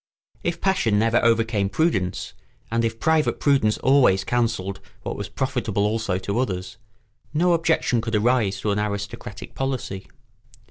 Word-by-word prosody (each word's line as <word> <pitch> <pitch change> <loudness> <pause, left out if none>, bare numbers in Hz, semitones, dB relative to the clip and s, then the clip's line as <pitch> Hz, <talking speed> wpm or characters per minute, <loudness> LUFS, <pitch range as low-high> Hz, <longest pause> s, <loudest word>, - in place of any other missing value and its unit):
If 170 -1 -2
passion 185 - +2
never 115 +2 +2
overcame 115 -3 +2
prudence, 100 - 0 0.4
and 115 0 +1
if 115 0 -2
private 160 +1 +2
prudence 135 -7 +3
always 125 -8 +4
counselled 115 -5 -1 0.2
what - - -4
was 100 0 -5
profitable 115 -4 -1
also 105 -3 0
to 100 +4 -2
others, 95 -5 -3 0.6
no 175 +3 +3
objection 160 -7 +2
could 115 0 -2
arise 105 -3 +2
to 105 - 0
an 100 - 0
aristocratic 100 -1 -5
policy. 130 -8 -3
115 Hz, 140 wpm, -23 LUFS, 100-130 Hz, 0.6 s, always